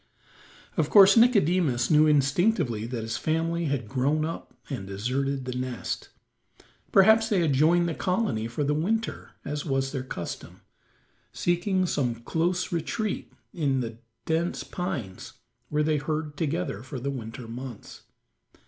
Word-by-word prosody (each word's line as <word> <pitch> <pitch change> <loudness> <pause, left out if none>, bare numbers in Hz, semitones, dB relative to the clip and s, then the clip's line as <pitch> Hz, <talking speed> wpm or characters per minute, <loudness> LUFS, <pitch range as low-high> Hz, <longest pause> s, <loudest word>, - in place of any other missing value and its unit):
Of - - +1
course 195 -2 +8
Nicodemus 180 - +3
knew 155 0 +6
instinctively 145 - +2
that 120 -2 -4
his 115 +1 -3
family 165 +2 0
had 140 -6 -2
grown 140 +5 +1
up 165 - -6 0.2
and 120 -9 -5
deserted 130 +7 -2
the 125 - -3
nest. 125 -2 -4 0.8
Perhaps 220 +3 +6
they 205 -5 +2
had 155 -4 +2
joined 170 +5 +4
the 165 - -1
colony 180 - -1
for 120 +5 -2
the 145 +1 +1
winter, 215 +9 -2
as 145 0 -3
was 135 -2 -1
their 135 - -3
custom, 105 -9 -7 0.7
seeking 175 - +1
some 130 -8 0
close 170 +9 -1
retreat 180 +6 -2 0.2
in 140 -6 0
the 115 -1 -6 0.3
dense 165 +2 -1
pines 145 - -5 0.4
where 150 0 +1
they 155 0 +2
herd 150 0 -3
together 155 - -2
for 130 +1 -7
the 140 +3 -2
winter 115 -2 -7
months. 120 -1 -8
150 Hz, 140 wpm, -27 LUFS, 125-175 Hz, 0.8 s, course